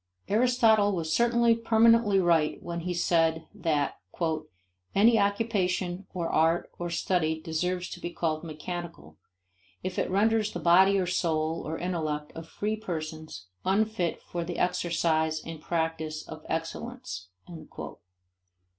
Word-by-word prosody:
Aristotle 220 Hz, -2 st, +4 dB
was 160 Hz, -2 st, -2 dB
certainly 235 Hz, 0 st, +4 dB
permanently 230 Hz, -2 st, +4 dB
right 165 Hz, -4 st, +3 dB
when 170 Hz, 0 st, -4 dB
he 180 Hz, +2 st, -3 dB
said 165 Hz, -2 st, +2 dB
that 150 Hz, -4 st, -1 dB, 1.0 s
"any 225 Hz, +3 st, +6 dB
occupation 200 Hz, -3 st, 0 dB
or 170 Hz, -2 st, -2 dB
art 165 Hz, +2 st, +2 dB
or 175 Hz, 0 st, -3 dB
study 165 Hz, -2 st, 0 dB
deserves 180 Hz, +3 st, -2 dB
to -, -, -7 dB
be 175 Hz, -, -4 dB
called 160 Hz, -2 st, -2 dB
mechanical 155 Hz, -, -7 dB, 0.7 s
if 185 Hz, 0 st, -3 dB
it -, -, 0 dB
renders 215 Hz, +2 st, +2 dB
the 175 Hz, -, -3 dB
body 185 Hz, +4 st, +5 dB
or 185 Hz, -, +1 dB
soul 165 Hz, -2 st, 0 dB
or 160 Hz, +1 st, -3 dB
intellect 155 Hz, -4 st, -3 dB
of 165 Hz, 0 st, -8 dB
free 210 Hz, +5 st, -2 dB
persons 155 Hz, -, -6 dB, 0.2 s
unfit 200 Hz, -2 st, 0 dB
for 175 Hz, -1 st, -4 dB
the 175 Hz, +1 st, -5 dB
exercise 165 Hz, -3 st, +1 dB
and 165 Hz, -2 st, -7 dB
practice 160 Hz, -2 st, -2 dB
of 155 Hz, -1 st, -9 dB
excellence." 165 Hz, -, -4 dB
175 Hz, 130 wpm, -28 LUFS, 160-200 Hz, 1.0 s, any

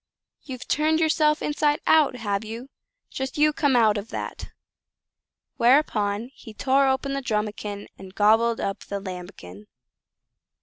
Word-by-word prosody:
you've 255 Hz, -3 st, -9 dB
turned 315 Hz, +1 st, +2 dB
yourself 310 Hz, -1 st, +2 dB
inside 295 Hz, 0 st, +1 dB
out, 310 Hz, -5 st, +4 dB
have 205 Hz, -3 st, -2 dB
you? 230 Hz, +4 st, -8 dB, 0.4 s
Just 265 Hz, +1 st, -5 dB
you 300 Hz, 0 st, +4 dB
come 285 Hz, -4 st, +1 dB
out 220 Hz, -3 st, +4 dB
of 205 Hz, -, -9 dB
that!" -, -, -6 dB, 1.1 s
Whereupon 235 Hz, -3 st, +2 dB
he 220 Hz, -6 st, -13 dB
tore 270 Hz, +3 st, +2 dB
open 265 Hz, +1 st, 0 dB
Drumikin 210 Hz, -3 st, -3 dB
and 190 Hz, 0 st, -12 dB
gobbled 225 Hz, +2 st, +3 dB
up 195 Hz, -, -3 dB
Lambikin. 180 Hz, -, -8 dB
235 Hz, 125 wpm, -24 LUFS, 205-280 Hz, 1.1 s, out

